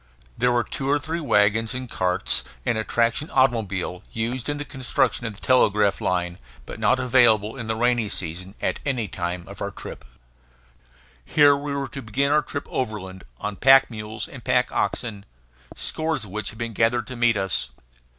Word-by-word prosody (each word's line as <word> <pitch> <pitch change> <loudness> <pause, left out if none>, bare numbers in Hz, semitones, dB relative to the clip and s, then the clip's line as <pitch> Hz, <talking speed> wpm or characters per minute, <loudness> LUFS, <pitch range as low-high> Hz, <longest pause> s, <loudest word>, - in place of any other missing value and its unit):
There 125 0 +2
were 120 -1 +2
two 135 +3 -3
or 145 - +4
three 160 +3 -4
wagons 110 -4 +2
and 130 0 -4
carts, 90 -4 +1 0.2
and - - +1
a 110 - -1
traction 115 +7 +1
automobile, 105 -9 +1
used 120 +4 -2
in 145 - -1
the 145 - -5
construction 130 -3 0
of 105 - -6
the - - -13
telegraph 105 -5 +3
line, 90 -1 -1 0.3
but - - -8
not 130 - +3
available 120 -4 +4
in 120 -4 -6
the 110 - 0
rainy 120 -2 +1
season, 90 +3 -2
at - - 0
the 125 -6 -1
time 90 -3 -4
of - - -10
our - - -1
trip. - - -9 1.2
Here 145 -2 +5
we 140 0 -4
were 140 -1 -2
to 135 - -7
begin 135 +6 0
our 150 +1 +4
trip 145 -1 -5
overland, 95 -6 -4
on 105 -1 -4
pack 135 -1 +6
mules 110 0 -6
and 130 -4 -11
pack 125 0 +2
oxen, 105 -5 -2 0.5
scores 160 -5 -2
of 105 - -10
which 110 +2 -3
had 110 - -11
been 115 -1 -4
gathered 115 +2 +2
to 130 - -8
meet 120 -2 +3
us. 95 -10 -1
115 Hz, 185 wpm, -24 LUFS, 105-130 Hz, 1.2 s, pack